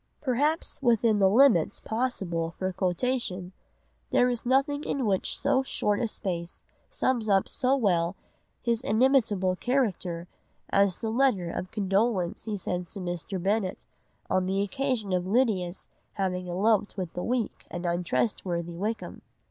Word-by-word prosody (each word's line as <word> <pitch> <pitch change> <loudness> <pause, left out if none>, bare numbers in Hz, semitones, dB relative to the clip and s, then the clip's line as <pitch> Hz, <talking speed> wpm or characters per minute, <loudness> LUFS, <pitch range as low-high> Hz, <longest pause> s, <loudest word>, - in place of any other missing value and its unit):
Perhaps 295 +5 0
within 230 -4 +3
the 195 -1 +5
limits 215 - +4
possible 190 -9 -2
for 185 0 -2
quotation 185 0 -1 0.6
there 250 - +4
is 240 0 -3
nothing 275 +3 +2 0.2
which 195 -3 +2
in - - -1
so 275 0 +2
short 210 -5 0
a 235 - +1
space 175 -5 -3 0.3
sums 240 -4 0
up 195 -1 +3
so 260 +1 +2
well 180 -6 +1 0.5
his 235 0 0
inimitable 220 -6 +3
character 185 -8 -1 0.4
as 200 -2 +3
the 225 - -3
letter 225 -9 +2
of 185 - -4
condolence 195 -2 0
he 215 -2 -2
sends 180 +1 -3
to - - -5
Mr. 175 +1 -3
Bennet 195 +1 -1 0.4
on 185 0 +1
the 195 +1 +1
occasion 240 -3 -1
of 180 0 0
Lydia's 195 -5 0 0.3
having 180 -2 -2
eloped 205 +3 +1
with 180 -3 -4
the 180 - -4
weak 240 +1 -2
and 175 +1 -5
untrustworthy 175 -1 -1
Wickham. 215 +6 -4
200 Hz, 140 wpm, -27 LUFS, 180-240 Hz, 0.6 s, the